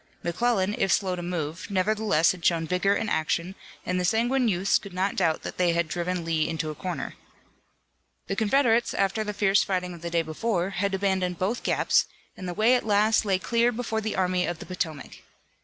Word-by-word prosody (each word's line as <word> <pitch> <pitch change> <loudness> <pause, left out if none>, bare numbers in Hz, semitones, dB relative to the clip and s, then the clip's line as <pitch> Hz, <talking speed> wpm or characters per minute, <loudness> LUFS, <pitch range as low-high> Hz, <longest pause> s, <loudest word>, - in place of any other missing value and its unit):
McClellan, 200 +2 +1
if 195 - +2
slow 190 -3 +1
to 175 - -5
move, 170 -2 -4
nevertheless 200 -3 +2
had 180 -2 -9
shown 165 -2 +2
vigor 180 +4 +1
in 225 - -2
action, 170 +1 -1 0.3
and 180 0 -1
the - - -1
sanguine 240 +6 +2
youths 190 -1 +2
could 200 -3 -11
not 190 +2 0
doubt 165 -4 +1
that - - -6
they 175 -2 +3
had 170 -1 0
driven 175 +1 -2
Lee 160 -2 0
into 160 -1 -2
a - - -6
corner. 180 +4 -5 1.1
The 195 - -3
Confederates, 235 +2 +2
after 195 +2 +1
the 210 - -3
fierce 200 -1 +3
fighting 180 -2 -2
of 170 - -11
the 170 - -4
day 170 -1 +1
before, 180 +3 -2
had 200 0 -1
abandoned 190 -2 0
both 205 +8 -1
gaps, - - +2 0.3
and 185 - -7
the 175 - -5
way 220 +4 +4
at 250 - +2
last 215 +1 +3
lay 195 -2 +2
clear 235 +5 +1
before 225 -2 -2
the 220 0 -3
Army 180 -1 +1
of 175 - -3
the - - -9
Potomac. 160 -5 -5
185 Hz, 205 wpm, -26 LUFS, 175-215 Hz, 1.1 s, way